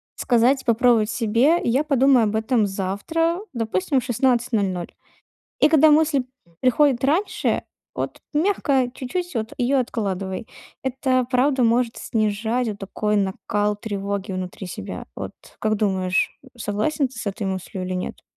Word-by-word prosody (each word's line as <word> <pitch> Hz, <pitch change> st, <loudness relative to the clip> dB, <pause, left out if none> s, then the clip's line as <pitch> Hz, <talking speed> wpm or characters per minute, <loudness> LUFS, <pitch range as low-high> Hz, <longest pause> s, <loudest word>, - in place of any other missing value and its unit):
сказать, 250 Hz, +3 st, +2 dB
попробовать 230 Hz, -2 st, +3 dB
себе: 245 Hz, +9 st, +3 dB
"Я 260 Hz, +6 st, +2 dB
подумаю 270 Hz, -4 st, +4 dB
об 215 Hz, +1 st, -1 dB
этом 220 Hz, 0 st, +2 dB
завтра", 205 Hz, -, -1 dB, 0.2 s
допустим, 225 Hz, +2 st, 0 dB
в -, -, -6 dB
16:00 230 Hz, -7 st, 0 dB, 0.7 s
и 295 Hz, -, +6 dB
когда 315 Hz, 0 st, +6 dB
мысль 295 Hz, -3 st, +3 dB, 0.4 s
приходит 255 Hz, 0 st, +3 dB
раньше, 325 Hz, +9 st, +1 dB, 0.3 s
вот -, -, -4 dB
мягко 295 Hz, -7 st, +2 dB
чуть-чуть 350 Hz, +6 st, -4 dB
вот 220 Hz, 0 st, -2 dB
её 260 Hz, +2 st, +2 dB
откладывай. 195 Hz, -4 st, -3 dB, 0.4 s
Это 260 Hz, -1 st, +1 dB
правда 260 Hz, +1 st, +3 dB
может 235 Hz, 0 st, +2 dB
снижать 220 Hz, +2 st, -1 dB
вот 205 Hz, -, -6 dB
такой 210 Hz, +2 st, -1 dB
накал 205 Hz, +1 st, 0 dB
тревоги 200 Hz, -1 st, -4 dB
внутри 185 Hz, +1 st, -5 dB
себя. 95 Hz, -, -6 dB
Вот -, -, -6 dB, 0.3 s
как 215 Hz, 0 st, +1 dB
думаешь, 190 Hz, -3 st, 0 dB, 0.2 s
согласен 235 Hz, +7 st, 0 dB
ты 250 Hz, -2 st, -14 dB
с -, -, -6 dB
этой 200 Hz, +1 st, -3 dB
мыслью 185 Hz, 0 st, -4 dB
или 185 Hz, -, -3 dB
нет? 180 Hz, -, -4 dB
230 Hz, 135 wpm, -23 LUFS, 205-265 Hz, 0.7 s, и